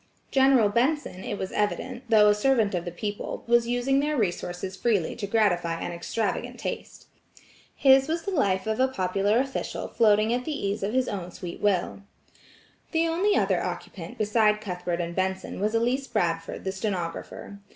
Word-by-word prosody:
General 265 Hz, -4 st, +5 dB
Benson, 235 Hz, -, 0 dB
it 205 Hz, -, -4 dB
was 190 Hz, -, -4 dB
evident, 240 Hz, +4 st, -2 dB
though 215 Hz, -2 st, +6 dB
a 210 Hz, -, +6 dB
servant 220 Hz, -1 st, +2 dB
of 175 Hz, -1 st, -2 dB
the 175 Hz, -, -4 dB
people, 205 Hz, +4 st, -5 dB
was 235 Hz, 0 st, +3 dB
using 245 Hz, +3 st, +1 dB
their 295 Hz, +1 st, 0 dB
resources 180 Hz, -2 st, -2 dB
freely 200 Hz, -4 st, 0 dB
to 200 Hz, -, -4 dB
gratify 175 Hz, -6 st, +1 dB
an -, -, -4 dB
extravagant 195 Hz, +5 st, -3 dB
taste. -, -, -6 dB, 0.7 s
His 270 Hz, 0 st, +5 dB
was 330 Hz, +1 st, -2 dB
the 400 Hz, -, -3 dB
life 195 Hz, -, +1 dB
of 220 Hz, +1 st, -1 dB
a 260 Hz, -, +4 dB
popular 200 Hz, -2 st, 0 dB
official 265 Hz, +1 st, -2 dB
floating 215 Hz, 0 st, +3 dB
at 250 Hz, +1 st, -1 dB
the 285 Hz, -7 st, -3 dB
ease 200 Hz, +2 st, -2 dB
of 200 Hz, +3 st, -2 dB
his 260 Hz, -1 st, +2 dB
own 185 Hz, -3 st, -4 dB
sweet 175 Hz, -1 st, -8 dB
will. 200 Hz, -1 st, 0 dB, 0.9 s
The 330 Hz, 0 st, +2 dB
only 365 Hz, +6 st, +2 dB
other -, -, +2 dB
occupant 170 Hz, -3 st, -6 dB
beside 210 Hz, 0 st, +2 dB
Cuthbert 180 Hz, -4 st, -3 dB
and 170 Hz, 0 st, -4 dB
Benson 190 Hz, 0 st, -2 dB
was 210 Hz, +3 st, 0 dB
Elise 250 Hz, +4 st, +1 dB
Bradford 165 Hz, -1 st, -2 dB
the 190 Hz, -, -2 dB
stenographer. 190 Hz, 0 st, -5 dB
210 Hz, 170 wpm, -26 LUFS, 185-250 Hz, 0.9 s, though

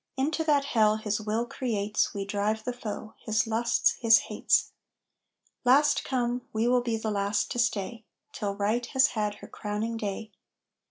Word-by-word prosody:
Into 305 Hz, +4 st, 0 dB
that 290 Hz, -3 st, +3 dB
hell 215 Hz, -5 st, +3 dB
his 215 Hz, -1 st, -2 dB
will 220 Hz, +2 st, -1 dB
creates 215 Hz, -4 st, -1 dB
We 200 Hz, -2 st, -4 dB
drive 210 Hz, +2 st, -1 dB
the 250 Hz, -, -3 dB
foe 220 Hz, -2 st, -6 dB
his 215 Hz, 0 st, 0 dB
lusts, 230 Hz, +1 st, +1 dB
his 230 Hz, -1 st, +7 dB
hates. -, -, +1 dB, 0.9 s
Last 275 Hz, +4 st, +4 dB
come, 245 Hz, -1 st, -1 dB
we 220 Hz, +2 st, 0 dB
will 250 Hz, 0 st, +3 dB
be 235 Hz, -2 st, -1 dB
last 205 Hz, -2 st, -1 dB
to 245 Hz, -, -2 dB
stay, 225 Hz, 0 st, -1 dB, 0.3 s
Till 200 Hz, -1 st, -3 dB
Right 210 Hz, +4 st, 0 dB
has 265 Hz, +2 st, +3 dB
had 210 Hz, -2 st, -2 dB
her -, -, -12 dB
crowning 215 Hz, +2 st, -4 dB
day. 210 Hz, 0 st, -4 dB
220 Hz, 160 wpm, -28 LUFS, 210-245 Hz, 0.9 s, his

